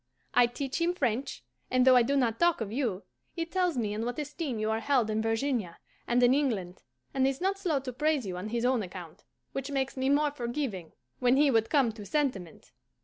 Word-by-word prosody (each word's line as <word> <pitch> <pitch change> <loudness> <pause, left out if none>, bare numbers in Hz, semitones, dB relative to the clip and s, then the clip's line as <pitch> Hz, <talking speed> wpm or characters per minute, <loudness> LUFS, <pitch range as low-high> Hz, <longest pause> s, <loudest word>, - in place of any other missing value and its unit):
I 245 - +5
teach 270 +5 -4
him 350 +1 +1
French; 255 -4 -2 0.3
and 255 0 +3
though 260 -1 +7
I 250 - +7
do 270 +4 +1
not 230 -4 +1
talk 345 -1 +3
of 215 -3 -4
you, 225 -6 -2 0.3
he 335 -2 -2
tells 360 -3 0
me 215 -3 -1
in 215 +2 -3
what 245 +1 -3
esteem 295 -3 -4
you 215 0 -1
are 220 - 0
held 245 -3 +1
in 215 0 0
Virginia 225 -4 -1 0.3
and 245 +1 +2
in 245 +1 +6
England, 220 -11 -1 0.3
and 265 -1 +2
is 270 0 -1
not 390 +2 0
slow 330 -8 0
to 255 -1 -6
praise 300 -1 0
you 185 -2 -4
on 185 +4 -5
his 235 +1 -1
own 255 -2 +2
account, 180 -4 -9 0.3
which 270 +1 -4
makes 270 -1 -1
me 265 0 0
more 290 +1 +3
forgiving 240 - -4 0.3
when 250 +1 +3
he 290 -1 +5
would 225 -2 +2
come 275 -6 +3
to 215 -1 -10
sentiment! 205 - -3
250 Hz, 220 wpm, -29 LUFS, 220-285 Hz, 0.3 s, though